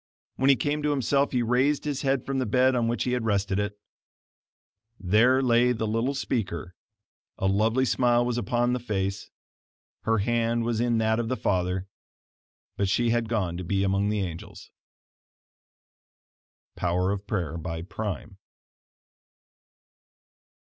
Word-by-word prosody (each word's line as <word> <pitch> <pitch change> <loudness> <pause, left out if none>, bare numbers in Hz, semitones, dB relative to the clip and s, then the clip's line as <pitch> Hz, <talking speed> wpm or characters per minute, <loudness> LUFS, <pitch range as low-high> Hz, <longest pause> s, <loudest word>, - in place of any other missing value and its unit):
When 135 +1 +3
he 140 - +7
came 150 +2 -1
to 150 - 0
himself 140 0 +1
he 125 -2 +1
raised 130 +6 +1
his 145 -3 -2
head 135 -2 0
from 135 -1 -1
the 130 - -1
bed 130 +4 +3
on 120 -2 +1
which 120 +1 0
he 125 - -1
had 125 -2 0
rested 100 -2 0
it; 105 0 -3 1.2
there 115 +8 +3
lay 125 0 +4
the 110 -1 -2
little 115 +6 0
speaker, 95 -10 -3 0.6
a - - -2
lovely 110 +6 +2
smile 120 -1 +2
was 120 -1 -1
upon 120 +2 0
the 125 - -1
face, 100 -4 -3 0.7
her 115 0 +1
hand 115 +2 +1
was 115 -1 -1
in 120 -1 +1
that 110 0 +1
of 115 -1 -2
the 130 - -1
father, 90 0 -1 0.9
but 100 -1 0
she 120 +3 +2
had 120 -1 0
gone 95 -7 -1
to 90 - -5
be 95 +3 0
among 100 +1 +1
the 105 -1 0
angels. 85 -3 -7 2.0
Power 90 +2 0
of 100 0 -4
Prayer 90 -7 -2
by 80 0 -5
Prime. 100 -2 -6
115 Hz, 150 wpm, -26 LUFS, 100-125 Hz, 2.0 s, he